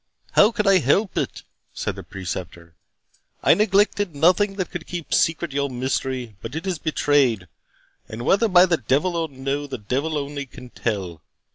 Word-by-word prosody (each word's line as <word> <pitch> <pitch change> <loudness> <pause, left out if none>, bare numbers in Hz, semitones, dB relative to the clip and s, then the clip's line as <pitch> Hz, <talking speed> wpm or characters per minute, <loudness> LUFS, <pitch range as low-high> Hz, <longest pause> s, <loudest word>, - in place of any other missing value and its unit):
"How 210 - +5
could 220 -3 -1
I 195 -1 +5
help 185 - +1
it?" - - -3 0.3
said - - -3
the - - -7
Preceptor. 85 -3 -7 0.7
"I - - +6
neglected 205 -3 +2
nothing 185 +7 +3
that 185 -2 -3
could 175 -3 -6
keep 175 -3 -5
secret 165 -2 +1
your 140 0 0
mystery; 130 -2 -3
but 115 +5 -7
it 165 +4 -4
is 185 -5 -2
betrayed, 135 - +1 0.6
and 110 +2 -6
whether 205 +4 +3
by 180 -2 +6
the 175 -3 +1
devil 145 +9 0
or 165 -1 -1
no, 140 +2 -3
the 135 -2 -5
devil 135 +9 -2
only 140 -1 -4
can 125 0 -12
tell. 95 -8 -3
145 Hz, 170 wpm, -23 LUFS, 125-180 Hz, 0.7 s, I